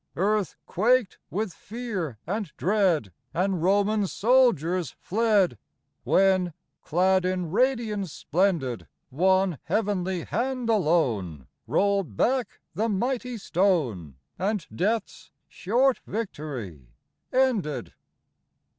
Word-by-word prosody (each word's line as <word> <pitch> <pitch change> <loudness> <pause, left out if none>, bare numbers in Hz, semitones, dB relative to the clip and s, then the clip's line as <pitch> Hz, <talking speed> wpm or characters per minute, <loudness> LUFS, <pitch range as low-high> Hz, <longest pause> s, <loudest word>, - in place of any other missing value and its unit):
Earth 205 +1 0
quaked 235 +2 +2
with 205 -1 -2
fear 205 - -5
and 200 -1 -3
dread, 180 - +1 0.2
And 185 -1 0
Roman 200 +3 +2
soldiers 185 - +2
fled, 205 - +2 0.4
When, 185 -3 +3 0.3
clad 185 +3 +2
in 180 -3 -1
radiance 220 - 0
splendid, 160 - 0 0.2
One 185 +2 +2
heavenly 190 -5 -1
hand 250 -1 -1
alone 120 - +1 0.2
Rolled 195 - +1
back 250 -3 0
the 225 +2 0
mighty 245 +4 -1
stone, 150 - 0 0.2
And 200 -2 -1
Death's 215 +5 -2 0.2
short 245 +7 +1
victory 140 - -5 0.4
ended 245 - 0
190 Hz, 95 wpm, -26 LUFS, 165-220 Hz, 0.4 s, When